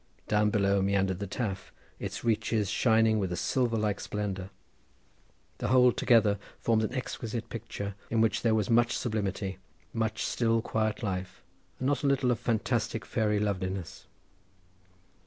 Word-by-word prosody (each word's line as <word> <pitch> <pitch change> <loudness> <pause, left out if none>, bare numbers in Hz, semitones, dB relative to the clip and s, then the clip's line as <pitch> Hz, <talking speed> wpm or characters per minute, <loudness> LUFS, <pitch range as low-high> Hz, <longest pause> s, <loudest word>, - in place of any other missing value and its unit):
Down 105 0 +3
below 100 -1 +2
meandered 95 -1 +1
the 100 - -3
Taf, 100 -2 -3 0.3
its - - -5
reaches 110 -3 +1
shining 110 -2 +3
with 95 -3 -1
a - - -1
silver 120 +4 0
like 105 -2 0
splendour. 100 -3 -4 1.1
The - - -1
whole 125 +2 +6
together 110 -5 +3 0.2
formed 110 -1 +1
an 110 - -1
exquisite 115 -3 -4
picture, 100 -3 -5 0.2
in 115 - +1
which 110 0 +2
there 115 -2 +3
was 105 -3 +1
much 120 +1 +3
sublimity, 100 -4 -2 0.3
much 110 -1 -1
still, 115 -1 +1
quiet 110 +1 -1
life, 95 -2 -4 0.3
and 130 - -4
not 145 +2 +1
a - - +3
little 130 -2 +2
of 115 - 0
fantastic 115 -2 -1
fairy 105 -1 +1
loveliness. 95 -4 -3
110 Hz, 150 wpm, -29 LUFS, 100-115 Hz, 1.1 s, whole